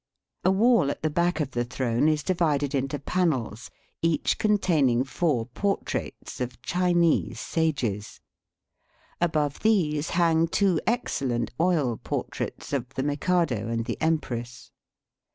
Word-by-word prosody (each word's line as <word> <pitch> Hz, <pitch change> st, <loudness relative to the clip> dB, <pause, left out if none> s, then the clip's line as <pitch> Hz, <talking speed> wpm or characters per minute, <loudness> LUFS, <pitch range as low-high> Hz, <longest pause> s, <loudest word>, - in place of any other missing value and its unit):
A -, -, +4 dB
wall 215 Hz, -, +4 dB
at -, -, -5 dB
the 155 Hz, -, +1 dB
back 170 Hz, 0 st, +1 dB
of 145 Hz, -3 st, -1 dB
the 120 Hz, -1 st, -1 dB
throne 120 Hz, +2 st, 0 dB
is 155 Hz, -1 st, 0 dB
divided 150 Hz, -6 st, +1 dB
into 135 Hz, +1 st, -1 dB
panels, 135 Hz, -, -1 dB, 0.3 s
each 165 Hz, -3 st, +1 dB
containing 160 Hz, -, +2 dB
four 135 Hz, -3 st, 0 dB
portraits 195 Hz, -, -3 dB
of 125 Hz, 0 st, -4 dB
Chinese 175 Hz, -2 st, +1 dB
sages. 135 Hz, -11 st, -2 dB, 1.0 s
Above 150 Hz, -4 st, 0 dB
these 160 Hz, -9 st, +1 dB
hang 165 Hz, -1 st, +3 dB
two 185 Hz, -1 st, +2 dB
ex 240 Hz, -5 st, 0 dB
cellent 120 Hz, -3 st, -1 dB
oil 160 Hz, -9 st, +2 dB
portraits -, -, -5 dB
of 130 Hz, -2 st, -2 dB
the 135 Hz, -, -1 dB
Mikado 145 Hz, -, 0 dB
and 115 Hz, 0 st, -2 dB
the 120 Hz, -, -4 dB
empress. 125 Hz, -7 st, -2 dB
150 Hz, 130 wpm, -26 LUFS, 125-175 Hz, 1.0 s, A